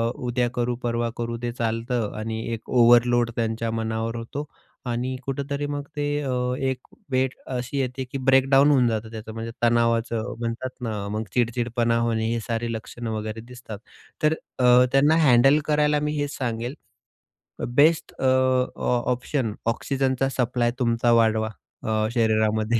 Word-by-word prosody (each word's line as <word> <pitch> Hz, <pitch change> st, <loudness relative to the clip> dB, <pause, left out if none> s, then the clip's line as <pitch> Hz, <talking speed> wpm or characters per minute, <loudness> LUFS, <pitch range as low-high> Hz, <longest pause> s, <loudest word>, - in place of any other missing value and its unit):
उद्या 125 Hz, 0 st, -1 dB
करू, 120 Hz, 0 st, -1 dB
परवा 120 Hz, 0 st, 0 dB
करू 115 Hz, 0 st, -3 dB
ते 120 Hz, 0 st, -2 dB
चालतं 115 Hz, -1 st, -2 dB
आणि 110 Hz, +1 st, -3 dB
एक 115 Hz, 0 st, -7 dB
ओव्हरलोड 120 Hz, 0 st, +5 dB
त्यांच्या 115 Hz, 0 st, -1 dB
मनावर 115 Hz, 0 st, -2 dB
होतो. 125 Hz, +6 st, -5 dB, 0.4 s
आणि 125 Hz, +2 st, -2 dB
कुठेतरी 140 Hz, +1 st, -3 dB
मग 145 Hz, 0 st, -3 dB
ते 145 Hz, -1 st, -1 dB, 0.2 s
अ, 135 Hz, -3 st, -2 dB, 0.3 s
एक 130 Hz, -1 st, -2 dB, 0.2 s
वेळ 130 Hz, 0 st, +1 dB
अशी 125 Hz, +1 st, -3 dB
येते 130 Hz, 0 st, -2 dB
की -, -, -3 dB
ब्रेक 135 Hz, 0 st, +5 dB
डाउन 140 Hz, +2 st, +6 dB
होऊन 130 Hz, -4 st, +4 dB
जातं 110 Hz, -1 st, -2 dB
त्याचं, 110 Hz, -1 st, -8 dB
म्हणजे 115 Hz, +1 st, -5 dB
तणावाचं 115 Hz, 0 st, +1 dB
म्हणतात 115 Hz, +2 st, -3 dB
ना, 105 Hz, -4 st, -3 dB
मग 110 Hz, +1 st, -2 dB
चिड-चिडपणा 120 Hz, -1 st, +1 dB
होणे, 115 Hz, -1 st, 0 dB
हे 120 Hz, -, -1 dB
सारे 115 Hz, 0 st, -2 dB
लक्षणं 115 Hz, +1 st, -6 dB
वगैरे 110 Hz, 0 st, -4 dB
दिसतात. 120 Hz, -3 st, -9 dB, 0.5 s
तर 155 Hz, +1 st, +4 dB, 0.3 s
अ, 125 Hz, 0 st, +6 dB
त्यांना 145 Hz, +3 st, +4 dB
हँडल 135 Hz, +2 st, +6 dB
करायला 150 Hz, 0 st, +2 dB
मी 150 Hz, 0 st, -2 dB
हेच 145 Hz, 0 st, -2 dB
सांगेल, 120 Hz, 0 st, -3 dB, 1.0 s
बेस्ट 155 Hz, +4 st, +4 dB
अ, -, -, -4 dB, 0.5 s
ऑ 125 Hz, -, 0 dB, 0.2 s
ऑप्शन 125 Hz, -2 st, -1 dB
ऑक्सिजनचा 135 Hz, +2 st, 0 dB
सप्लाय 125 Hz, -1 st, +1 dB
तुमचा 120 Hz, -1 st, +2 dB
वाढवा 110 Hz, -1 st, +1 dB, 0.3 s
अ, 110 Hz, 0 st, 0 dB
शरीरामध्ये. 110 Hz, -1 st, +2 dB
120 Hz, 150 wpm, -24 LUFS, 115-130 Hz, 1.0 s, डाउन